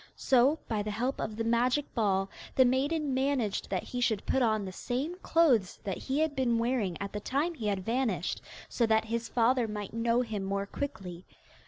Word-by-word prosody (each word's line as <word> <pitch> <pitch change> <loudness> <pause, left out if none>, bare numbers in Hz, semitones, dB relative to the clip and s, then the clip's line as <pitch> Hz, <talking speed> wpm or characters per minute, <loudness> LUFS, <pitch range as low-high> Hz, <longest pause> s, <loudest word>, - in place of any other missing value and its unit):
So, 265 +4 +4
by 215 -2 -1
the 210 - -3
help 245 +6 -2
of 215 - -3
the 225 - -2
magic 245 +5 +1
ball, 195 -4 +1 0.3
the 260 - +6
maiden 280 +3 +1
managed 260 -6 0
that - - -1
he 250 - -4
should 220 -5 +1
put 265 - +1
on 215 -4 +2
the 190 - -5
same 260 - -3
clothes 260 - +3
that 195 -2 -3
he 270 +1 -2
had 315 -2 0
been 250 -3 +2
wearing 230 -7 0
at 200 0 -5
the 210 - -2
time 285 +10 -1
he 230 -9 -4
had 195 -2 -1
vanished, 230 -7 -1 0.3
so 235 - +1
that 220 0 +3
his 230 +1 -3
father 240 0 +2
might 210 -2 -5
know 230 +1 +2
him 220 -5 -3
more 200 +1 -1
quickly. 190 -8 -6
235 Hz, 200 wpm, -30 LUFS, 210-260 Hz, 0.3 s, the